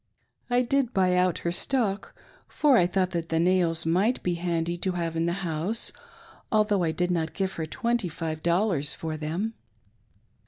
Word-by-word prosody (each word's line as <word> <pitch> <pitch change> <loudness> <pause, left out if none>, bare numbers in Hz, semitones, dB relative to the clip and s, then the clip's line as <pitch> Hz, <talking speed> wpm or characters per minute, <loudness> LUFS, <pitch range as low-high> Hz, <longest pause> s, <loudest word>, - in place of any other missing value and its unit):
I 245 +1 +3
did 260 -1 0
buy 185 -1 +3
out 180 -1 +2
her 170 - +2
stock, 210 +1 -1 0.3
for 290 -3 +3
I 175 -6 +5
thought 185 0 0
that 170 -2 -3
the 165 - +1
nails 170 -2 +2
might 190 +9 +2
be 180 - +1
handy 170 -1 -1
to 185 +1 -1
have 170 -2 -2
in 165 +1 +1
the - - +1
house, 170 +8 -2 0.6
although 210 -3 +3
I 165 -2 +1
did 180 +3 0
not 165 -2 -1
give 190 -1 -1
her 160 -1 -4
twenty 235 +1 -1
five 160 -1 -4
dollars^for 165 -4 0
them. 170 +9 -2
180 Hz, 170 wpm, -27 LUFS, 165-205 Hz, 0.6 s, I